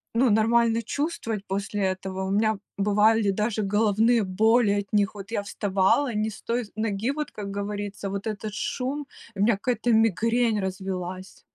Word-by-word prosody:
ну, 245 0 +4
нормально 230 +1 +3
чувствовать 230 -5 -3
после 200 +1 -3
этого. 190 0 -2
У 190 - -2
меня 215 +1 +2 0.2
бывали 210 +1 +3
даже 210 +2 0
головные 215 +3 +3
боли 220 +4 +3
от 200 -1 -7
них. 205 -2 +2
Вот 200 -1 -9
я 205 - -1
вставала 200 +6 +1
не 215 +1 0
с - - -11
той 240 +1 -1
ноги, 215 +2 -1
вот, 300 +1 -3
как 200 -1 -6
говорится, 200 0 -4
вот 200 0 -4
этот 215 -1 -4
шум, 265 +7 -3 0.3
у - - -9
меня 220 +2 +4
какая-то 240 +4 -1
мигрень 225 +1 +2
развилась. 185 -1 -5
210 Hz, 160 wpm, -25 LUFS, 195-230 Hz, 0.3 s, ну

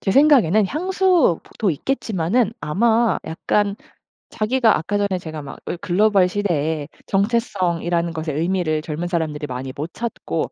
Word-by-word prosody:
제 195 - -1
생각에는 220 - +5
향수 360 - +2
보 - - -21
도 200 -4 +2
있겠지만은 215 - 0
아마 225 +8 +2
약간 200 +5 0 0.9
자기가 225 -3 +5
아까 205 +6 -2
전에 200 -3 0
제가 155 -3 -7
막 140 - -9
을 - - -3
글로벌 195 +2 +3
시대에 160 -6 -1 0.2
정체성이라는 175 -5 0
것의 155 -2 -3
의미를 165 -3 0
젊은 160 +2 -4
사람들이 155 -4 -2
많이 130 +1 -5
못 155 +4 -5
찾고 235 0 -3
180 Hz, 325 characters per minute, -21 LUFS, 160-220 Hz, 0.9 s, 생각에는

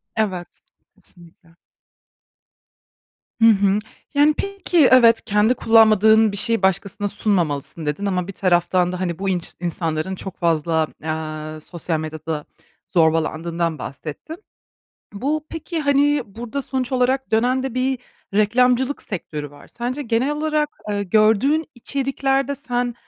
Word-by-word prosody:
Evet, 190 -5 -3 0.4
kesinlikle. 170 -1 -20 1.9
Hı 225 - +7
hı. 200 -1 +4 0.3
Yani, 295 +1 +4
peki, 390 -6 +2
evet, 235 -3 +6
"Kendi 210 +2 +3
kullanmadığın 220 -2 +5
bir 200 - -4
şeyi 230 0 +2
başkasına 195 +2 0
sunmamalısın." 165 -7 -1
dedin 150 +7 -2
ama 180 -3 -1
bir 195 - -7
taraftan 180 -1 +2
da, 180 - -5
hani, 175 -2 -3
bu 195 - -1
inç 180 -2 -2
insanların 170 +1 -2
çok 190 -1 -8
fazla, 160 -2 +1 0.2
eee, 155 -1 -5
sosyal 165 -1 -3
medyada 155 -1 -5 0.5
zorbalandığından 165 0 +1
bahsettin. 155 - -8 0.7
Bu, 295 +8 -2
peki, 330 0 -4
hani, 285 -1 +2
burada 235 +7 -6
sonuç 260 -1 -3
olarak 260 +1 +1
dönen 250 +4 +2
de 265 -2 -4
bir 255 0 0 0.4
reklamcılık 250 +5 +2
sektörü 150 -6 -6
var. 145 - -16
Sence 245 +4 -4
genel 240 +2 0
olarak, 300 0 -1
eee, 205 -1 -1
gördüğün 220 - +3
içeriklerde 275 +2 -1
sen, 245 -3 -2
210 Hz, 125 wpm, -21 LUFS, 170-260 Hz, 1.9 s, Hı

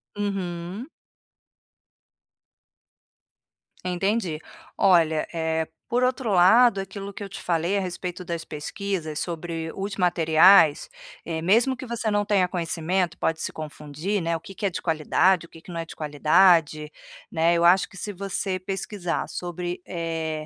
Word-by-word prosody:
Uhum. 195 +1 -4 3.0
Entendi. 185 -2 -1 0.4
Olha, 165 -5 +3
eh, 160 -1 -1 0.2
por 245 +1 +1
outro 250 -2 0
lado, 200 +5 +6
aquilo 195 +1 -7
que 205 - -7
eu 200 - -7
te - - -8
falei 170 +3 0
a - - +2
respeito 180 0 -5
das 170 -1 -4
pesquisas 160 0 -4
sobre 165 -1 -4
os 200 +1 -4
materiais, 170 - +5 0.4
eh, 160 -1 -3
mesmo 230 +9 +3
que 260 - -7
você 235 -2 -2
não 205 0 +1
tenha 200 -3 +2
conhecimento, 175 0 -1
pode 160 0 -1
se - - -3
confundir, 155 +5 -4
né, 165 0 -1
o - - -3
que 195 - -11
que 205 - -4
é - - +3
de 180 - -5
qualidade, 170 +2 +2
o - - -18
que 165 - -15
que 180 - -12
não 170 - -4
é 165 - -4
de - - -11
qualidade, 155 0 +3 0.4
né, 165 0 +2
eu 170 0 +2
acho 180 +2 +5
que - - -18
se 205 - -5
você 195 -1 -3
pesquisar 190 -1 -3
sobre, 175 0 -5
eh 160 -2 -3
175 Hz, 155 wpm, -25 LUFS, 165-195 Hz, 3.0 s, lado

